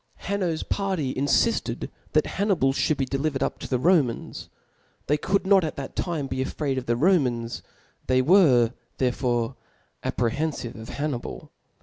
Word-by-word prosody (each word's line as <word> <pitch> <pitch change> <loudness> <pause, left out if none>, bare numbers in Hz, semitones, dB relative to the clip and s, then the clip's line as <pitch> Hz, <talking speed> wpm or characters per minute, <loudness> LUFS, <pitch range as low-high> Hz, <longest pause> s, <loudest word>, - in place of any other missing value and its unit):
Hanno's 185 -5 -2
party 190 -10 -1
infifted 145 - +1 0.2
that - - +4
Hapnii}^ 185 -10 +1
(hould 155 - +1
be 135 - 0
delivered 135 +1 -1
up - - -2
to - - -6
the 130 - +1
Romans 145 -4 +1 0.5
^. - - -44
They 150 - +2
could 195 +6 0
not 195 -1 +5
at 155 - -3
that 135 -1 -7
time 160 -6 -2
)>c 130 0 -1
|fraid 135 -1 -2
of 125 - -10
the 120 - +2
Romans^ 125 -7 +1 0.5
the/ 130 0 +3
were 130 - +5 0.2
therefore 125 -1 0 0.5
apprehenfive 125 0 -1
of 110 +1 -10
Hannibal. 145 -4 -4
140 Hz, 150 wpm, -25 LUFS, 125-170 Hz, 0.5 s, not